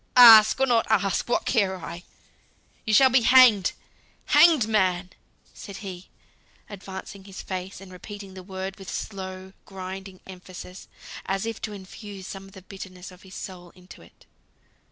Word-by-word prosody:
"Ask, 225 -2 +9
or 270 - +4
not 235 -3 +2
ask, 200 0 +1
what - - 0
care 200 -6 +1
I? 170 -1 -8 0.8
You 220 - -1
shall 265 +1 +6
be 260 0 +4
hanged 235 -6 +6 0.5
hanged 315 -10 +5
man!" 185 -4 0 0.4
said 200 -2 -10
he, 185 -1 -8 0.6
advancing 195 -1 -9
his 195 -2 -9
face, 185 0 -6
and 195 -1 -13
repeating 200 +1 -10
the 185 - -9
word 190 +1 -7
with 195 - -9
slow, 190 -2 -7
grinding 190 0 -8
emphasis, 185 0 -11 0.4
as 195 +2 -1
if 230 -1 -5
to 215 - -5
infuse 195 0 -10
some 195 0 -8
of 195 - -16
the 190 -2 -13
bitterness 190 -1 -10
of 180 0 -16
his 190 -1 -14
soul 180 -2 -9
into 180 0 -15
it. - - -20
195 Hz, 155 wpm, -25 LUFS, 185-210 Hz, 0.8 s, Ask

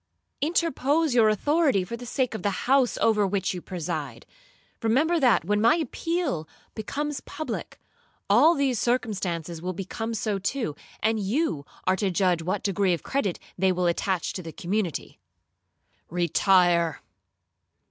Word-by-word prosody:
Interpose 315 -2 +1
your 225 -3 +5
authority 275 - +2
for 210 +6 -5
the 245 +1 -9
sake 255 0 0
of 220 - -5
the 205 - +1 0.2
house 265 -1 +3
over 210 -3 +3
which 190 -1 -1
you 180 - -6
preside. 165 -5 -5 0.6
Remember 290 +10 +2
that, 245 - +3
when 210 +2 +1
my 230 +5 +5
appeal 325 - -2 0.3
becomes 285 +6 -3
public, 310 +2 -6 0.5
all 275 +12 +6
these 270 -5 +1
circumstances 185 -9 -1
will 185 +1 -3
become 225 +5 -4
so 210 -2 -1
to, 195 - -2 0.3
and 220 0 +1
you 200 - -1 0.2
are 185 - +3
to 195 +1 0
judge 180 -1 +1
what 185 +4 -2
degree 195 -2 +1
of 165 - -11
credit 235 -10 -1 0.2
they 190 0 +4
will 180 0 0
attach 175 +1 0
to 185 - -5
the 165 -2 -8
community.' 185 0 -3 0.9
'Retire!' 175 -2 +3
210 Hz, 145 wpm, -26 LUFS, 180-260 Hz, 0.9 s, all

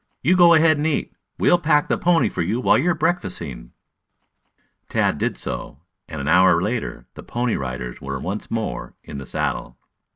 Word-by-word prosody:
"You 180 - +4
go 175 -2 +7
ahead 155 -1 +4
and 150 +2 0
eat. 155 - -2 0.2
We'll 175 - +4
pack 150 -3 +2
the - - +1
pony 175 -1 +2
for - - -3
you 100 +8 -1
while - - +4
you 160 +7 +2
are 175 - +2
breakfasting." 90 - -3 1.2
Tad - - +1
did - - -1
so, 70 - -6 0.3
and 80 -3 -7
an 70 - -4
hour 90 +1 +5
later 110 +6 -3
the - - -10
Pony 120 -1 -2
Riders 65 -2 -5
were 70 0 -4
once 100 +7 -5
more 115 -1 -4
in 70 - -8
the 70 - -9
saddle. 60 - -3
110 Hz, 185 wpm, -22 LUFS, -, 1.2 s, go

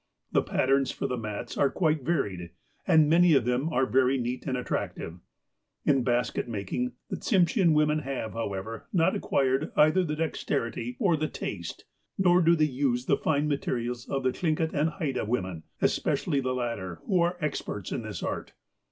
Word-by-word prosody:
The - - +3
patterns 135 +1 +1
for - - -4
the 125 - -1
mats 110 0 -5
are 140 - +4
quite 155 -3 +1
varied, 105 - -1 0.4
and 155 -2 +6
many 170 +1 +5
of 130 -4 +3
them 125 +5 0
are 135 -5 +2
very 130 +1 +3
neat 125 +2 -3
and 130 -2 0
attractive. 90 -7 -4 0.7
In 135 -2 +4
basket 120 0 0
making, 115 +3 -3 0.2
the - - -2
Tsimshean 180 -3 +3
women 150 0 +3
have, 135 -6 -4
how 115 -3 -3
ever, 110 +4 -6
not 165 -3 +3
acquired 135 +3 0
either 155 +5 +5
the 155 -3 -2
dexterity 125 -6 -2
or 175 +2 +3
the 155 0 -1
taste, 85 - -6 0.3
nor 180 -1 +4
do 170 0 +5
they 155 -2 +3
use 130 -3 0
the - - +3
fine 150 -1 0
materials 120 -4 -2
of 135 -1 -1
the 130 - +2
Thlingit 160 +2 -1
and 150 +2 +2
Haida 150 -7 -2
women, 95 -8 -3 0.2
especially 140 - +1
the 130 0 -1
latter, 110 -8 -3
who 185 -3 +2
are 175 +1 +1
experts 150 -2 -3
in - - -2
this - - -6
art. - - -4
135 Hz, 180 wpm, -28 LUFS, 120-155 Hz, 0.7 s, and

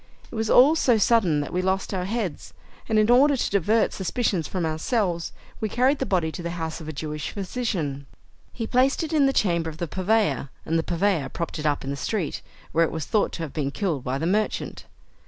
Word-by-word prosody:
It - - -13
was 220 -1 -2
all 275 +5 +7
so 245 -7 +3
sudden 200 -9 +3
that 145 - -6
we 180 - +1
lost 190 +2 -1
our 180 -1 -1
heads, 205 -4 -4 0.3
and 220 - +2
in 215 +2 +4
order 275 +3 +5
to - - 0
divert 205 +3 +2
suspicion 195 -1 0
from 170 +2 -3
ourselves, 170 +2 -1 0.3
we 215 - -2
carried 260 +6 +2
the 265 - -1
body 175 -5 +1
to 175 - -7
the 170 - -3
house 160 0 -4
of 155 - -9
a - - -3
Jewish 150 0 -4
physician. 180 - -3 0.4
He 230 - -4
placed 260 +7 +2
it 320 - -4
in 290 -3 +4
the - - +3
chamber 170 -9 +1
of 155 - -10
the 170 0 -3
purveyor, 185 - +1 0.2
and 165 +1 +1
the - - -1
purveyor 175 -4 0
propped 170 -1 -4
it 155 - -1
up 145 -1 0
in 135 - -4
the - - -2
street, 175 +3 -2 0.3
where 165 - +3
it 165 - 0
was 160 -2 -4
thought 215 - +1
to 165 - -4
have 150 - -6
been 145 -3 -1
killed 160 - -2
by 130 +1 -2
the 160 - -2
merchant. 210 +5 -1
185 Hz, 230 wpm, -25 LUFS, 160-225 Hz, 0.4 s, all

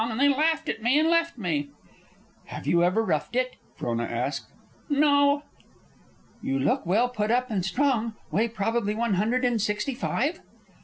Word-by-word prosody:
And 225 0 -3
they 285 +1 +5
laughed 315 +3 +1
at 225 - -3
me 245 +5 +3
and 310 +1 +3
left 335 -3 +1
me." 155 -9 -2 0.8
"Have - - -8
you 170 0 +3
ever 185 +6 +2
roughed 170 +3 -1
it?" 255 0 0 0.2
Frona 120 0 -2
asked. 120 +5 -3 0.4
"No." 285 0 +3 1.0
"You 135 - -1
look 135 +4 0
well 220 +7 +3
put 215 -4 -2
up 250 +1 +1
and 195 -4 0
strong. 235 +1 0 0.2
Weigh 225 +3 +2
probably 225 -1 -1
one 230 -1 0
hundred 230 +7 +1
and 240 -3 +1
sixty 210 +6 -1
five?" 285 +6 -1
230 Hz, 165 wpm, -26 LUFS, 200-275 Hz, 1.0 s, they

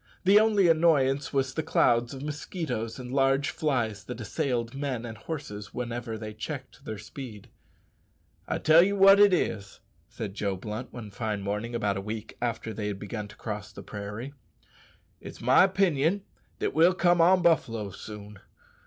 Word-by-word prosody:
The 195 +3 +7
only 210 -4 +4
annoyance 150 -5 +3
was 135 -2 0
the 160 - -1
clouds 120 -5 +2
of 135 0 -7
mosquitoes 145 - -4
and 125 -1 -7
large 135 +2 +2
flies 120 -9 -1
that 125 -1 -7
assailed 120 -1 -2
men 135 -4 -3
and 115 -1 -6
horses 110 -5 -7
whenever 120 -2 -4
they 110 -1 -7
checked 130 +4 -7
their 110 - -5
speed. 110 0 -9 1.0
"I - - -1
tell 160 +2 +6
ye 195 +3 +2
wot 195 0 +7
it 205 -1 +7
is," 100 - -1 0.3
said 100 -3 -6
Joe 100 -1 -2
Blunt, 105 +6 -6
one 110 -4 -8
fine 105 -1 -3
morning 105 +4 -3
about 100 -4 0
a - - -3
week 110 +2 -6
after 115 -2 -2
they 105 0 -3
had 100 -2 -3
begun 105 +1 -5
to 105 - -14
cross 105 -2 -6
the - - -10
prairie, 105 +6 -7 0.9
"it's - - -10
my 130 +10 +5
'pinion 190 -1 +1 0.3
that - - -2
we'll 170 +4 +5
come 175 -2 +3
on 180 +2 +5
buffaloes 115 - +1
soon. 105 -1 -9
120 Hz, 170 wpm, -28 LUFS, 105-155 Hz, 1.0 s, The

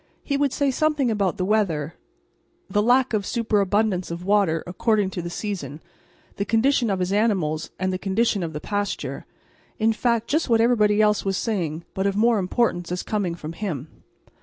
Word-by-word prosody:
He 280 - -1
would 280 -1 +1
say 280 0 +1
something 300 -3 +1
about 205 -2 0
the 185 - -1
weather, 175 -7 0 0.7
the 205 - +1
lack 250 +3 +3
or 215 - +2
superabundance 205 -3 0
of 170 +1 -6
water, 195 -5 +2
according 205 +2 0
to 180 - -4
the 170 - -5
season, 170 -7 -5 0.6
the 200 - 0
condition 235 +3 +2
of 195 - 0
his 185 +1 -1
animals 185 -8 0
and 185 0 -1
the 185 - -2
condition 200 +1 +1
of 165 -2 -4
the 150 - -4
pasture 205 +4 -3 0.5
in 225 +1 +2
fact, 235 0 0
just 310 +2 0
what 230 -1 +4
everybody 215 -3 +4
else 210 -1 +2
was 195 -1 -1
saying 170 -8 -2
but 190 +1 0
of 200 - -1
more 225 +1 +3
importance 180 -3 0
as 180 - -2
coming 195 -6 -2
from 160 -1 -7
him. 160 -7 -4
205 Hz, 185 wpm, -23 LUFS, 180-225 Hz, 0.7 s, what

